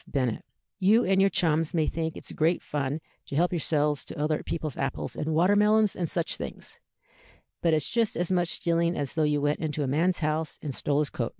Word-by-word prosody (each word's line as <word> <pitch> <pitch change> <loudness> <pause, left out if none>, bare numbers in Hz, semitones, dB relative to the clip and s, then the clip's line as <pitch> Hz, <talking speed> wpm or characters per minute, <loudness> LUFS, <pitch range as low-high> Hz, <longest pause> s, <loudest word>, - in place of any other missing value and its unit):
Bennet; 125 -5 -1 0.4
you 215 +5 +4
and 190 0 +3
your 195 - +5
chums 165 -1 +1
may 160 -2 +2
think 160 +1 -3
it's - - -6
great 165 +3 +1
fun 145 0 -2 0.3
to - - -5
help 175 +4 +2
yourselves 150 -3 +1
to - - -9
other 150 +1 0
people's 155 -4 -4
apples 135 -1 -3
and 155 +1 -2
water 180 +5 +4
melons 210 0 +4
and 170 -3 -2
such 170 -1 -1
things, - - -8 0.8
but 170 - +3
it's 155 - 0
just 230 -2 0
as 175 +1 -1
much 175 -2 +2
stealing 170 +1 0
as 140 -3 -2
though 160 - 0
you 150 -1 +2
went 145 +1 +1
into 155 -2 -2
a - - -1
man's 170 +7 +1
house 155 0 -1
and 145 -3 -3
stole 145 +2 -1
his 150 - -2
coat.' 120 -2 -2
160 Hz, 215 wpm, -27 LUFS, 150-175 Hz, 0.8 s, your